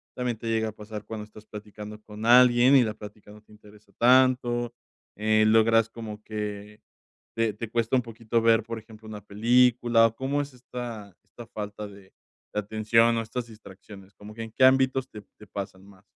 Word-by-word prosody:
¿También 125 -3 -2
te 115 - -8
llega 110 -1 0
a - - -7
pasar 105 0 -9
cuando 105 0 -7
estás 105 0 -16
platicando 105 0 -10
con 105 +1 -9
alguien 125 +2 +6
y 125 - +5
la 110 -1 -2
práctica 105 -1 -12
no 105 0 -15
te - - -25
interesa 105 -1 -19
tanto? 120 -1 +3 0.4
Eh, 110 0 +2
logras 115 0 +4
como 110 -2 -9
que 105 -1 -6 0.5
te 115 -1 +1
te 110 +1 -7
cuesta 115 +2 0
un - - +2
poquito 115 0 -2
ver, 115 -1 +4
por 115 0 -6
ejemplo, 110 0 -16
una 105 -1 -8
película 120 +2 +3
o 115 - -8
¿cómo 135 +3 -2
es 140 -2 -8
esta 120 -5 -8
esta 120 - -13
falta 105 0 -7
de 100 -1 -16 0.4
atención 110 +2 +2
o - - 0
estas 115 +2 -5
distracciones 100 -2 -14
como 105 +1 -12
que 115 +1 -7
en 110 - -9
qué 130 - 0
ámbitos 130 0 +3
te 105 - -10 0.2
te 105 - -14
pasan 95 -1 -7
más? 100 -1 -19
110 Hz, 190 wpm, -26 LUFS, 105-120 Hz, 0.5 s, alguien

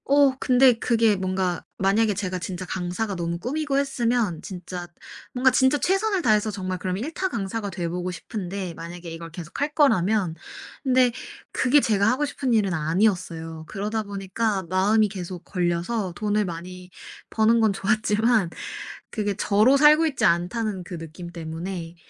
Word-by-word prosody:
어 280 -1 +4
근데 255 0 +5
그게 225 -3 +3
뭔가 185 -2 -1
만약에 205 +3 +2
제가 185 -2 -3
진짜 185 0 -5
강사가 190 +3 -3
너무 170 -1 -2
꿈이고 275 - -2
했으면 240 - 0
진짜 180 -1 -7 0.5
뭔가 260 +1 +4
진짜 260 +3 +3
최선을 390 +4 +1
다해서 215 -1 +3
정말 185 -2 -4
그럼 185 0 -2
일타 325 - -2
강사가 210 - -3
돼 175 -2 -3
보고 180 +2 -3
싶은데 185 0 -5
만약에 170 +1 -8
이걸 165 0 -7
계속할 185 - -4
거라면. 215 - +2 0.5
근데 255 -2 +4 0.4
그게 280 +3 +4
제가 205 -5 +2
하고 265 +5 +1
싶은 265 -3 -2
일은 205 -4 +2
아니었어요. 165 -1 -1
그러다 215 +2 -3
보니까 200 +1 -2
마음이 205 +4 +3
계속 185 -3 -7
걸려서 180 +2 -1
돈을 210 +1 0
많이 180 +1 -7 0.4
버는 225 +1 +3
건 220 -2 +4
좋았지만 215 +1 +2 0.6
그게 205 -2 -1
저로 215 +7 +4
살고 305 +3 +6
있지 270 -7 0
않다는 185 +3 0
그 175 0 -7
느낌 165 +2 -8
때문에 165 +1 -6
200 Hz, 330 characters per minute, -24 LUFS, 180-235 Hz, 0.6 s, 살고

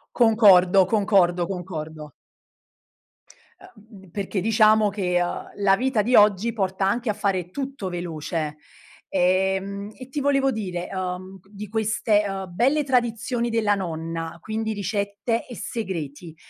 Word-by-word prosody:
Concordo, 195 -5 +6
concordo, 190 -4 +2
concordo. 160 -5 -6 1.5
Uh - - -14
mhmm, 205 -4 -17
perché 195 +1 -3
diciamo 215 +1 +4
che, 185 -3 0
uhm, 175 - -3
la 195 -1 +5
vita 255 -1 +1
di 245 +5 0
oggi, 210 +1 +5
porta 190 -3 -1
anche 235 +3 0
a - - +2
fare 195 -4 -2
tutto 270 -5 -5
veloce. 165 -3 -4 0.5
Ehm, 190 +2 0
e 255 0 -10
ti 290 - -3
volevo 275 -1 +2
dire, 185 -6 -4
uhm, 185 0 -5
di 210 0 -8
queste, 215 0 +1
uhm, 195 -1 -4
belle 275 +9 +2
tradizioni 240 -2 0
della 215 -3 +2
nonna, 165 -2 -4
quindi 220 +3 -3
ricette 200 +3 -2
e 245 - -9
segreti, 165 - -5
200 Hz, 130 wpm, -24 LUFS, 180-220 Hz, 1.5 s, Concordo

